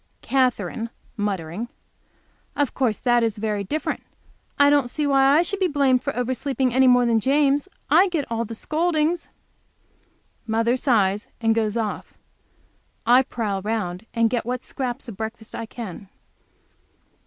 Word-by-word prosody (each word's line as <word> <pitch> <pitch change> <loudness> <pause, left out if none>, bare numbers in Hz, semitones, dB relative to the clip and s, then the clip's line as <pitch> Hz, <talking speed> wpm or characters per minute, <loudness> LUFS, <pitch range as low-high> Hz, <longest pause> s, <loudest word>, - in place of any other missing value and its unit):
Katherine, 230 -4 0 0.3
muttering. 200 0 -3 0.9
"Of 285 -3 0
course 240 -6 0
that 240 -1 +2
is 225 -2 0
very 210 -1 -2
different. 305 +11 -3 0.6
I 285 0 +6
don't 285 -4 +3
see 300 +4 -2
why 275 0 +4
I 335 - +4
should 400 +3 -2
be 375 - +3
blamed 275 -5 +2
for - - -2
oversleeping 260 +1 -1
any 260 +1 +5
more 245 -1 +5
than 230 -1 +3
James. 285 - +2 0.2
I 390 - +5
get 320 -6 -1
all 230 0 0
the 230 0 -7
scoldings." 320 +4 0 1.2
Mother 230 +2 +2
sighs 210 -6 +1
and 225 -1 +2
goes 220 -1 0
off. 220 -3 -4 0.9
I 245 +3 +6
prowl 210 -6 -3
round 205 -2 -3
and 230 -1 +2
get 240 -2 0
what 250 +1 -3
scraps 255 0 -4
of 220 -5 -8
breakfast 220 0 -6
I 230 - -5
can. 205 -5 -8
240 Hz, 150 wpm, -23 LUFS, 220-275 Hz, 1.2 s, I